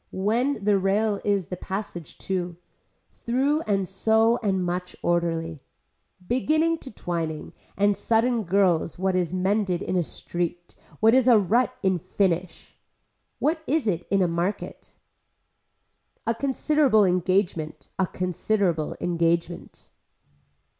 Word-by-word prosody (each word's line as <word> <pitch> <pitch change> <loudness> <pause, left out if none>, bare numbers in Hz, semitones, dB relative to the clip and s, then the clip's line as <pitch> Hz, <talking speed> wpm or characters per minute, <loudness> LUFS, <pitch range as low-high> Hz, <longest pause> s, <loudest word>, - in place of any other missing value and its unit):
When 220 +5 0
the 205 -2 +4
rail 200 +2 +1
is 200 -3 +1
the 180 - -3
passage 190 -3 -6
to. 180 -2 -3 0.6
Through 275 +6 0
and 195 -3 +1
so 220 +4 +2
and 190 -4 0
much 180 +1 -3
orderly. 165 -2 0 0.7
Beginning 315 +6 +1
to 265 - -9
twining 165 -6 -4 0.2
and 205 0 +3
sudden 230 +3 +1
girls 180 -4 +1
what 190 0 0
is 180 -2 0
mended 185 0 0
in - - -2
a 180 - +3
street, 175 +1 -4 0.3
what 225 +1 +6
is 260 -1 +4
a 240 -3 +7
rut 215 +4 +2
in 190 -2 +2
finnish. 180 0 -2 0.6
What 315 +2 0
is 290 -3 +1
it 175 -4 -1
in 195 -1 +3
a - - +2
market. 170 +4 -4 1.3
A 230 - +1
considerable 270 -2 +2
engagement, 180 -5 0
a 190 - +2
considerable 180 -2 -1
engagement. 170 0 -1
195 Hz, 125 wpm, -25 LUFS, 175-220 Hz, 1.3 s, a